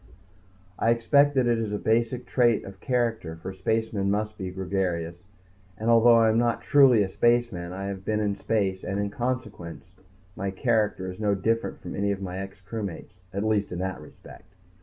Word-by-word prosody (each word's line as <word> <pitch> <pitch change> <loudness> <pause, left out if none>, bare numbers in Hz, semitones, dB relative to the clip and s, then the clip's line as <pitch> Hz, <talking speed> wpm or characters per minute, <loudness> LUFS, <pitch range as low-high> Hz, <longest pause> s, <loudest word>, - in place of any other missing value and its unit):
I 115 - +2
expect 140 +5 +4
that 130 -2 +3
it 120 -1 +2
is 110 -2 -2
a 105 - -1
basic 115 +3 0
trait 120 -3 +2
of 95 -1 -11
character, 115 -9 -1
for 85 +4 -7
spacemen 105 +1 -1
must 105 +1 -1
be 95 -3 -5
gregarious, 90 -2 -3 0.5
and 110 +2 +1
although 115 +1 +7
I 115 -1 +5
am 110 +1 +3
not 120 -1 0
truly 130 -7 +6
a - - -1
spaceman 115 -4 +1
I 95 +2 -5
have 100 -1 -5
been 105 +2 0
in 105 -2 0
space 100 -2 -1
and, 100 0 -2
in 100 0 -2
consequence, 115 -8 -5 0.4
my 95 +1 -3
character 105 -2 0
is 90 - -12
no 105 -2 +1
different 115 +4 -1
from - - -7 0.3
my 95 0 -4
ex 95 0 -8
crewmates 100 -3 -6 0.2
at 100 +2 -2
least 110 -2 0
in 90 - -4
that 95 -2 -3
respect. 95 +4 -15
105 Hz, 180 wpm, -26 LUFS, 95-115 Hz, 0.5 s, although